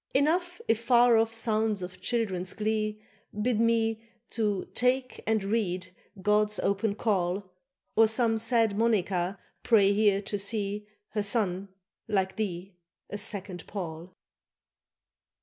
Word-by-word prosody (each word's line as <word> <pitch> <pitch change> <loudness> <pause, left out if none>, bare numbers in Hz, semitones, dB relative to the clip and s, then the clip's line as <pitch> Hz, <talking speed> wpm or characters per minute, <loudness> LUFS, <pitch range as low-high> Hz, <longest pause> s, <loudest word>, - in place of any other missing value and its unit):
Enough 350 +7 +1
if 225 - +2
far 240 0 +5
off 225 0 +3
sounds 220 -3 +1
of 180 0 -8
children's 190 -4 -1
glee 215 0 -1 0.4
Bid 225 0 +1
me 225 -1 +2 0.3
to 210 -4 0
"take 250 +1 +1
and 220 -2 +2
read" 185 -4 -1 0.3
God's 210 +2 +2
open 200 +1 0
call, 190 -3 -1 0.4
Or 225 0 +6
some 225 0 +2
sad 225 -2 +2
Monnica 200 -4 +1 0.2
pray 205 -4 +4
here 205 -1 +3
to 205 0 -4
see 205 0 -3 0.2
Her 210 - -1
son, 200 -2 -1 0.4
like 190 -3 0
thee, 195 -3 -4 0.4
a 205 - -4
second 190 -3 -5
Paul. 170 -3 -6
210 Hz, 125 wpm, -28 LUFS, 195-225 Hz, 0.4 s, Or